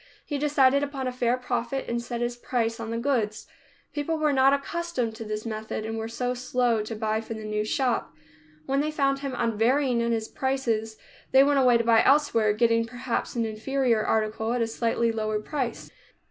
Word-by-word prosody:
He 290 -2 -3
decided 280 -2 +3
upon 280 -2 -3
a 255 - -1
fair 250 0 +1
profit, 250 +1 -2
and 235 0 -1
set 235 0 -5
his 240 0 -1
price 230 -2 -2
on 225 -1 -5
the 230 - -2
goods. 230 -4 -1 0.5
People 300 +2 -1
were 305 -2 +2
not 265 0 +5
accustomed 280 -4 -2
to 225 - -7
this 215 0 -4
method 220 -1 -4
and 220 - -4 0.2
so 245 +2 -2
were - - +1
slow 245 -2 +1
to 225 +1 -5
buy 215 0 -1
from 225 0 -6
the 220 - -8
new 210 0 -1
shop. 245 +3 0 0.5
When 275 +1 0
they 305 - -1
found 275 -2 +1
him 275 -2 -4
unvarying 235 +3 +2
in 235 0 0
his 225 -1 -1
prices, 230 -5 -1 0.3
they 265 +1 +7
went 285 0 +3
away 250 -2 +5
to 230 - 0
buy 230 -1 +5
elsewhere, 265 -7 +4
getting, 230 +1 +2
perhaps, 245 +2 -3
an 230 -1 0
inferior 230 +1 0
article 220 +1 0
at 245 - 0
a - - +1
slightly 230 0 0
lower 215 -1 -1
price. 260 +2 -4
240 Hz, 200 wpm, -26 LUFS, 225-270 Hz, 0.5 s, they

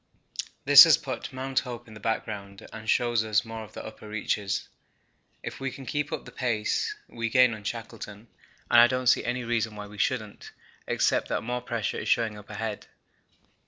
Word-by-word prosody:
This - - +11
has - - +6
put - - -5
Mount 130 +1 -1
Hope 120 -2 -7
in 110 - -12
the 110 - -10
background 100 -2 -4
and 110 -1 -7
shows 120 -2 +2
us 105 0 +1
more 115 0 -6
of 105 - -13
the - - -7
upper 110 -1 -10
reaches. 105 -2 -2 0.8
If - - -6
we 135 0 -2
can 135 0 -10
keep 145 +2 -2
up - - -4
the - - -10
pace, 115 -4 -1
we 115 0 -3
gain 125 0 +5
on 110 -1 -8
Shackleton, 115 -1 -7 0.4
and 120 - +9
I 120 - +8
don't 130 0 -2
see 120 - +4
any 125 +1 -2
reason 115 -2 -1
why 105 0 -6
we 105 0 -12
shouldn't, 110 -2 -2 0.3
except - - +1
that - - -1
more 125 +2 -2
pressure 115 -3 -2
is - - -4
showing 115 -2 +2
up 105 0 -12
ahead. 110 -2 -5
115 Hz, 195 wpm, -27 LUFS, 105-120 Hz, 0.8 s, This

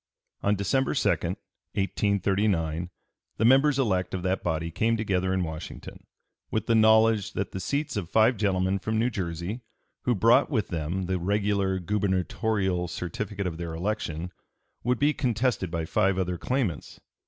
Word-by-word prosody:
On 100 +1 +2
December 105 +7 0
2, - - +2
1839, 95 -4 -1 0.5
the 110 - +2
members 135 +3 +5
elect 95 -9 0
of 90 - -4
that 95 0 0
body 80 0 -2
came 110 +7 +1
together 95 -4 0
in 95 -1 +1
Washington, 80 -1 -8 0.4
with 110 - -1
the 115 - +2
knowledge 110 -1 +4
that 95 - -3
the 95 - -4
seats 140 - -2
of 95 -5 -3
five 110 +5 +4
gentlemen 95 -2 +1
from 110 +3 -2
New 120 +3 +1
Jersey, 90 +3 -4 0.4
who 125 - +2
brought 115 +7 +4
with 110 -8 -1
them 85 +2 -2
the 95 0 -1
regular 100 0 +1
gubernatorial 95 0 0
certificate 100 +4 -4
of 85 -2 -4
their 85 -1 -4
election, 90 -2 -3 0.5
would 125 +1 +1
be 145 +3 +3
contested 120 - 0
by 85 -1 -2
five 95 +3 +1
other 90 -2 -1
claimants. 125 - -2
100 Hz, 155 wpm, -27 LUFS, 90-110 Hz, 0.5 s, members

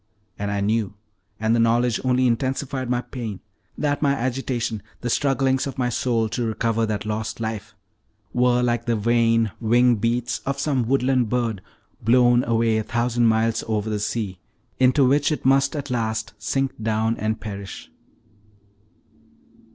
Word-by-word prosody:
And 100 0 -2
I 100 0 -1
knew, 105 0 0 0.4
and 110 +1 +2
the - - +2
knowledge 115 +1 +2
only 130 0 +2
intensified 130 +1 -1
my 125 0 +1
pain, 115 -7 -6 0.4
that 145 -1 0
my 140 -2 +3
agitation, 125 -4 -2 0.2
the 120 - -2
strugglings 135 -1 +1
of 135 - -6
my 125 -1 0
soul 115 -1 0
to 120 - -2
recover 115 0 0
that 105 -1 -3
lost 110 +1 -3
life, 110 -1 -5 0.6
were 125 0 +3
like 120 -1 0
the 120 - +2
vain 115 0 +2
wing 120 +1 +3
beats 120 +3 -1
of 140 0 -3
some 135 -4 0
woodland 130 -2 +2
bird, 115 -5 -1 0.4
blown 120 +1 +4
away 115 -1 +2
a - - -2
thousand 120 +1 +1
miles 115 0 +1
over 110 -1 -1
the 105 - -1
sea, 105 -3 -3 0.4
into 130 +2 +4
which 145 +3 +3
it 150 - -3
must 135 +2 +3
at 145 -2 -4
last 110 -2 -2
sink 135 -4 -2
down 110 +1 0
and 110 +1 -2
perish. 100 -2 -8
120 Hz, 155 wpm, -23 LUFS, 110-125 Hz, 0.6 s, blown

